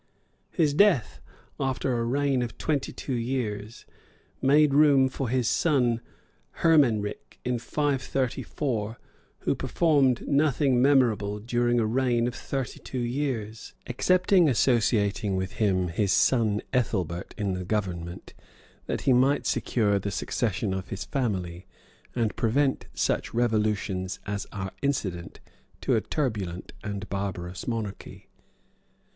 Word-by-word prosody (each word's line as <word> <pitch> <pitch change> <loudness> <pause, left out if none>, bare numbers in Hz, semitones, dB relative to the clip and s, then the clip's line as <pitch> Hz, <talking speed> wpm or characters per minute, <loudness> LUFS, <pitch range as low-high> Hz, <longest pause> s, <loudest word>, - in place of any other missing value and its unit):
His 155 -5 +1
death, 145 - +3 0.4
after 130 -1 -1
a 115 - 0
reign 135 +2 +1
of 120 -2 -4
twenty 145 -4 -1
two 135 - -5
years, 115 -3 -3 0.6
made 145 +1 +4
room 140 -2 +5
for 130 -2 -3
his 125 -1 +1
son 125 -8 +2 0.6
Hermenric 125 -11 +2
in 125 -1 0
534, 130 -4 -2 0.4
who - - +1
performed 140 -7 +2
nothing 140 -3 +2
memorable 120 -7 +3
during 120 +2 +1
a 115 - +2
reign 120 0 +1
of 120 - -3
thirty 135 0 -4
two 130 - -7
years; 120 -3 -3
excepting 180 +6 +3
associating 105 -5 +2
with 95 0 -2
him 95 -4 +2
his 100 +4 0
son 110 -1 +3
Ethelbert 95 -8 -1
in 100 -3 -1
the 90 0 -3
government, 90 -3 -4 0.5
that - - -2
he 130 - +3
might 130 +3 +3
secure 105 -4 +1
the 100 - -3
succession 105 0 -1
hi 95 0 -1
his 100 - -5
family, 95 -9 -3 0.5
and 115 -3 0
prevent 135 +4 +1
such - - -1
revolutions 105 -5 0
as 100 0 -4
are 95 -2 -5
incident 95 -12 -2 0.4
to - - 0
a - - +2
turbulent 105 - -3
and 100 0 -5
barbarous 95 -2 -4
monarchy. 110 -4 -5
120 Hz, 125 wpm, -27 LUFS, 100-135 Hz, 0.6 s, room